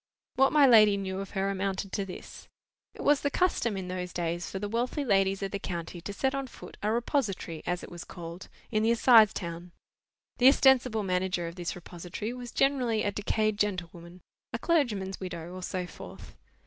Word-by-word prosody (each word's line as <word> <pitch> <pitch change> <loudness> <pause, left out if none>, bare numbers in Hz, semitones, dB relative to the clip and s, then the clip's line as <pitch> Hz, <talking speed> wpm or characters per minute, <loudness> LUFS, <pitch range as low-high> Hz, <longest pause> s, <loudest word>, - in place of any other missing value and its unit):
What 270 +1 +4
my 295 -2 +6
lady 215 -5 +7
knew 190 -1 -3
of 195 -1 -5
her 195 +1 +1
amounted 195 0 -2
to 200 - -1
this. 185 - -10 0.5
It - - -7
was 290 -1 +4
the 285 - +1
custom 280 - +1
in 185 -1 -5
those 180 0 -4
days 170 0 -3
for - - -5
the 205 +2 -3
wealthy 245 +6 -1
ladies 195 -3 +2
of 195 - -3
the 200 - -3
county 170 -2 -5
to 190 - -6
set 265 +6 0
on 275 -1 -3
foot - - -12
a 210 - 0
repository, 220 - -1
as 175 0 -1
it - - -10
was 175 0 -7
called, 170 0 -9 0.2
in 215 -2 +1
the 220 - +2
assize 230 -2 +6
town. 170 0 -6 0.7
The 250 - +7
ostensible 255 -5 +5
manager 180 -2 -1
of 165 - -6
this 175 -1 -4
repository 180 +5 -6
was 245 -1 -8
generally 250 -5 +1
a 205 - 0
decayed 210 +1 0
gentlewoman, 180 -3 -3 0.3
a - - -2
clergyman's 230 - 0
widow, 175 -2 -6
or 185 - -7
so 180 0 -3
forth. - - -11
195 Hz, 195 wpm, -29 LUFS, 180-235 Hz, 0.7 s, lady